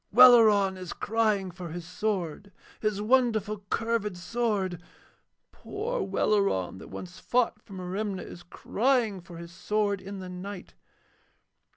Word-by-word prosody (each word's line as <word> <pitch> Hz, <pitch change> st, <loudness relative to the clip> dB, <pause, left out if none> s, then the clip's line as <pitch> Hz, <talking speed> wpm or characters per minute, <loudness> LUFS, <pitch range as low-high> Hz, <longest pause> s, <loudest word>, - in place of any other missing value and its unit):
'Welleran 215 Hz, -5 st, +7 dB
is 185 Hz, -2 st, -6 dB
crying 215 Hz, -4 st, 0 dB
for 175 Hz, -1 st, -8 dB
his 170 Hz, +1 st, -6 dB
sword, 195 Hz, -1 st, -3 dB, 0.3 s
his 215 Hz, -2 st, -1 dB
wonderful 220 Hz, -3 st, +2 dB
curved 225 Hz, -4 st, -1 dB
sword. 190 Hz, -3 st, -1 dB, 0.7 s
Poor 470 Hz, +5 st, -4 dB
Welleran, 95 Hz, -, +1 dB
that -, -, -10 dB
once 180 Hz, 0 st, -9 dB
fought 240 Hz, -3 st, +1 dB
for 200 Hz, -, -14 dB
Merimna, 190 Hz, +1 st, -3 dB
is 175 Hz, -, -10 dB
crying 220 Hz, +2 st, 0 dB
for 170 Hz, -1 st, -11 dB
his 170 Hz, 0 st, -9 dB
sword 205 Hz, +2 st, -1 dB
in 195 Hz, +1 st, -7 dB
the 185 Hz, -1 st, -7 dB
night. 180 Hz, +1 st, -8 dB
200 Hz, 130 wpm, -28 LUFS, 180-220 Hz, 0.7 s, Welleran